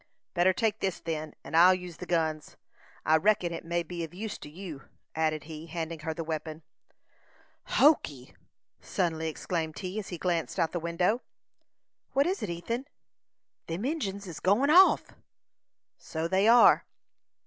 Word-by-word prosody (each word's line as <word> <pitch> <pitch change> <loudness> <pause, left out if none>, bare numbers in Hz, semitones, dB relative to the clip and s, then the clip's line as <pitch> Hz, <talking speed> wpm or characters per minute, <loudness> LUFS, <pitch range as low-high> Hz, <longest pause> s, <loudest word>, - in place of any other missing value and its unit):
"Better 180 +1 +4
take 220 +3 0
this, 190 -2 -2
then, 155 -2 -4
and 160 - -6
I'll 180 +3 +7
use 180 -2 -8
the 180 - -8
guns. 160 -3 -1 0.5
I 155 +1 +5
reckon 180 -1 +2
it 165 - -6
may 170 +1 -1
be 170 +1 -5
of 165 +2 -8
use 210 +2 -5
to - - -9
you," 165 -3 -8 0.3
added 155 -1 0
he, 155 +1 -9
handing 165 -1 -4
her 160 +1 -3
the 165 +1 -4
weapon. 155 0 -5 1.1
"Hokee!" 150 - +3 0.5
suddenly 160 -3 -1
exclaimed 160 0 -3
he, 185 +3 -4
as 205 - -6
he 175 - -5
glanced 170 0 -1
out 165 -3 +2
of - - -28
the 175 - -2
window. 175 +8 0 0.9
"What 275 +1 +3
is 375 +4 -1
it, 205 - -3
Ethan?" 230 +10 -4 0.8
"Them 170 +7 -3
Injins 205 -10 -2
is 165 -5 -7
go'n 210 - +3
off!" 370 +4 +6 0.9
"So 160 +1 -3
they 190 +4 +2
are." 235 +1 +6
175 Hz, 160 wpm, -29 LUFS, 160-195 Hz, 1.1 s, I'll